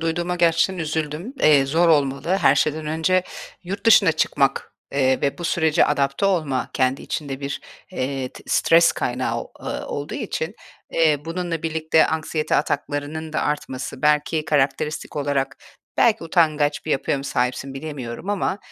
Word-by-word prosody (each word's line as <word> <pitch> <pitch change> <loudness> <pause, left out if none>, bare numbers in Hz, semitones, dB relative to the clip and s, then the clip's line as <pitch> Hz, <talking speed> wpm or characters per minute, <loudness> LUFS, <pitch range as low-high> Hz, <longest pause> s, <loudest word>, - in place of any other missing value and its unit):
duyduğuma 170 +2 -1
gerçekten 170 +2 +2
üzüldüm. 155 - -3
Eee, 145 -3 +5
zor 165 +4 +3
olmalı 140 -1 +2
her 140 -4 +5
şeyden 155 +2 0
önce 160 +4 +1 0.4
yurt 195 +5 -5
dışına 200 -7 +6
çıkmak, 135 -2 0 0.2
eee, 130 -2 +2
ve 140 +5 -1
bu 175 - -6
sürece 160 -3 +3
adapte 140 +5 +1
olma, 155 -9 0
kendi 130 +1 0
içinde 140 -3 -4
bir, 140 0 -4 0.3
eee, 135 -4 -2
t - - -14
stres 165 0 +4
kaynağı, 120 -2 -2
ııı, - - -5
olduğu 145 +1 -5
için, 205 - -3 0.4
eee, 155 -3 +2
bununla 165 -1 -3
birlikte 160 0 +2
anksiyete 155 -1 -1
ataklarının 145 +2 -2
da - - 0
artması 135 -3 -4
belki 150 +1 +2
karakteristik 150 +2 -1
olarak 140 -1 -1 0.4
belki 220 -5 +3
utangaç 155 -3 +1
bir 155 - -4
yapıya 140 0 0
mı 135 - -7
sahipsin, 125 0 -2
bilemiyorum 135 0 -6
ama, 200 0 -1
150 Hz, 145 wpm, -22 LUFS, 140-165 Hz, 0.4 s, dışına